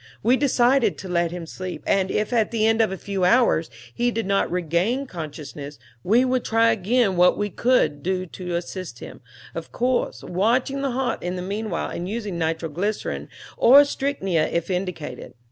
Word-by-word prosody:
We 240 +4 +4
decided 260 -2 +2
to 190 - -8
let 170 -1 +1
him 175 0 -6
sleep; 185 +2 -7
and 190 -1 +2
if, 210 +4 -1
at 225 -3 +2
the 225 -2 0
end 225 0 +3
of 220 - +2
a 190 - -4
few 195 -2 -3
hours, 180 -5 +3 0.2
he 240 0 +1
did 225 -2 -2
not 195 0 +1
regain 180 - 0
consciousness, 150 - -8 0.3
we 235 +7 +4
would 255 -1 0
try 230 0 +3
again 220 -1 +1
what 180 +1 +5
we 205 -1 -2
could 160 - +2
do 185 +3 -1
to 180 0 -6
assist 180 +1 -5
him, - - -10 0.3
of - - -7
course 250 +1 -1
watching 240 +9 0
the 275 - 0
heart 260 0 -1
in 180 +1 -3
the 180 - -4
meanwhile 200 -1 -3
and 175 +2 -4
using 210 -5 -4
nitro 165 0 -1
glycerin 200 +8 -3 0.3
or 280 +4 +8
strychnia 195 - -1
if 170 +2 -1
indicated. 180 -7 -4
195 Hz, 180 wpm, -23 LUFS, 175-235 Hz, 0.3 s, or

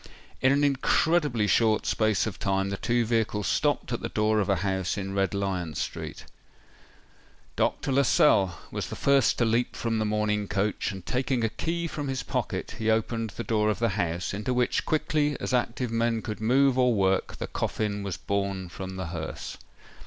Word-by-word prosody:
In 135 - +5
an 140 +1 +3
incredibly 140 -2 +2
short 110 +1 +3
space 110 -3 +2
of 110 -3 -5
time, 95 0 0
the 100 - -2
two 120 +2 +1
vehicles 110 -3 0
stopped - - 0
at - - -2
the - - -3
door 110 0 +2
of 100 - 0
a 100 - +4
house 95 0 -1
in 95 -1 -4
Red 100 0 0
Lion 95 -5 -2
Street. - - -5 1.3
Dr. - - 0
Lascelles 130 -8 +4 0.2
was - - -3
the - - -6
first 140 -4 +3
to 120 - +2
leap 115 +2 +1
from 115 -1 -1
the 110 - 0
mourning 105 -1 0
coach, 105 +2 -1
and, 95 -2 -9
taking 130 -1 0
a 115 - +2
key 170 +8 -2
from 150 -3 -4
his 135 -1 -2
pocket, - - -3
he 110 0 0
opened 115 0 0
the 120 - -4
door 110 -2 +1
of 105 - 0
the 115 0 +1
house, 85 -2 -2
into 105 +5 -2
which, 125 0 +1
quickly 150 -2 +1
as - - -3
active 125 0 0
men 115 -1 0
could 110 0 -5
move 130 +3 +3
or 125 -2 +4
work, 95 -1 +1
the - - -3
coffin 105 -1 -2
was 100 -3 -4
borne 100 -1 -2
from 95 +2 -7
the 95 -3 -4
hearse. 80 -2 -6
110 Hz, 190 wpm, -27 LUFS, 100-125 Hz, 1.3 s, In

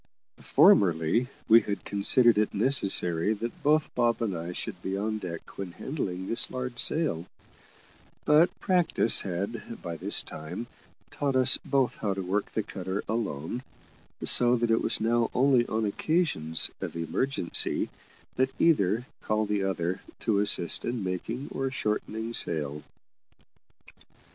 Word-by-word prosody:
Formerly 85 +6 +4 0.2
we 115 +1 +7
had 100 -1 -5
considered 110 +2 +3
it 105 - 0
necessary 100 -6 +2
that 115 +2 -6
both 150 +1 +2
Bob 120 -1 +1
and 100 -5 -2
I 85 +1 -5
should 90 0 -7
be 95 +2 -3
on 110 +2 -2
deck 85 -2 -8
when 95 -3 -5
handling 95 - -4
this 115 - -1
large 125 -1 -5
sail; 120 - +1 1.0
but 155 +4 +5
practice 180 -10 +3
had 100 +5 -5
by 85 -1 -5
this - - +1
time 80 +9 -7 0.5
taught 140 -2 -2
us 130 0 +6
both 135 -3 0
how 100 -3 -2
to 95 - -4
work 100 +3 -2
the 110 - -2
cutter 95 0 -5
alone, 110 - -3 0.6
so 120 0 +5
that 120 -1 0
it 115 - +2
was - - +1
now 115 +1 +1
only 130 -2 +3
on 110 0 -1
occasions 105 - +1
of - - -5
emergency 85 - 0 0.5
that 130 +1 -1
either 115 - +2 0.2
called 110 -1 -1
the 105 -2 0
other 90 -1 -2 0.2
to 105 -3 +1
assist 100 -4 +2
in 120 -3 -3
making 100 +8 -4
or 135 0 -2
shortening 110 -2 -3
sail. 75 -7 -2
110 Hz, 140 wpm, -27 LUFS, 90-125 Hz, 1.0 s, we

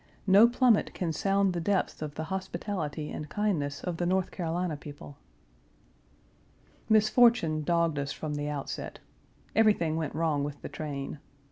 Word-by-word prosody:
No 200 +4 +7
plummet 240 -2 +2
can 170 -3 -2
sound 195 +2 +1
the 170 - -2
depths 190 -1 0
of 150 -2 -5
the 160 - -3
hospitality 170 -5 -4
and 150 -1 -6
kindness 155 -8 -1
of 175 -2 -3
the 175 - -1
North 185 0 +1
Carolina 175 -1 -2
people. 145 -1 -10 1.7
Misfortune 215 -6 +4
dogged 165 -1 +1
us 140 0 -3
from 155 -1 -4
the 145 0 -2
outset. 145 -2 -5 0.6
Everything 205 -8 +3
went 155 -3 -3
wrong 155 -3 +1
with 145 0 -5
the - - -5
train. 145 -2 -5
165 Hz, 145 wpm, -29 LUFS, 150-195 Hz, 1.7 s, No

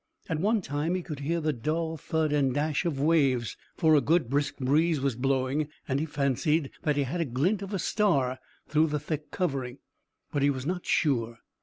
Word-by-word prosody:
At 160 -3 -1
one 210 +3 +2
time 150 +5 -1
he 185 - -2
could 150 -5 -6
hear 165 +4 -1
the 155 -1 0
dull 160 +6 -2
thud 155 0 -1
and 135 -3 +2
dash 150 +1 0
of 155 -5 -1
waves, 140 -6 +2 0.2
for 160 -1 +4
a 150 - +6
good 155 -2 +1
brisk 140 0 0
breeze 150 +4 +2
was 135 -3 0
blowing, 135 +3 0 0.2
and 135 0 0
he 160 - -2
fancied 145 +1 0
that 150 -2 +1
he 145 - +3
had 160 +7 -2
a - - +1
glint 155 - 0
of 195 0 -6
a 200 - -1
star 140 -11 +1 0.3
through 155 +2 +3
the 150 -1 -1
thick 150 0 -4
covering, 135 -8 -2 0.5
but 145 -3 -1
he 140 - +4
was 130 -2 -2
not 180 +2 -3
sure. 120 -7 +1
150 Hz, 205 wpm, -28 LUFS, 135-165 Hz, 0.5 s, a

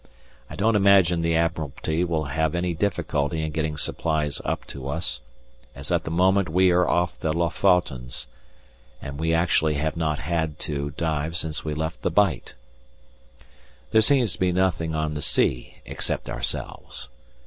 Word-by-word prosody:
I - - -8
don't 110 +2 +2
imagine 95 -4 +5
the 85 0 +1
Admiralty 80 0 -1
will 85 -3 0
have 80 +3 -1
any 85 0 0
difficulty 80 -4 -1
in 80 - -2
getting 75 -1 -2
supplies 75 -1 -1
up - - -2
to 65 -1 -7
us, 80 +2 -1 0.5
as - - -6
at - - +1
the - - -3
moment 95 +2 +3
we 90 +3 +4
are 90 0 +3
off 90 0 0
the 80 - 0
Lofotens, 85 -8 +1 0.7
and 70 +1 -7
we 80 +1 +1
actually 80 -2 +2
have 75 +1 -1
not 80 -2 0
had 80 -2 -2
to 70 -3 -2
dive 80 0 -1
since 80 -2 -2
we 75 -1 -3
left 80 +2 -3
the - - 0
Bight! 100 -11 +1 1.4
There 110 - +5
seems 120 -4 +3
to - - -9
be 90 -1 +2
nothing 90 -3 0
on 80 -1 -1
the 75 - -4
sea 65 -5 +1
except - - -3
ourselves. - - -3
80 Hz, 160 wpm, -24 LUFS, 75-90 Hz, 1.4 s, imagine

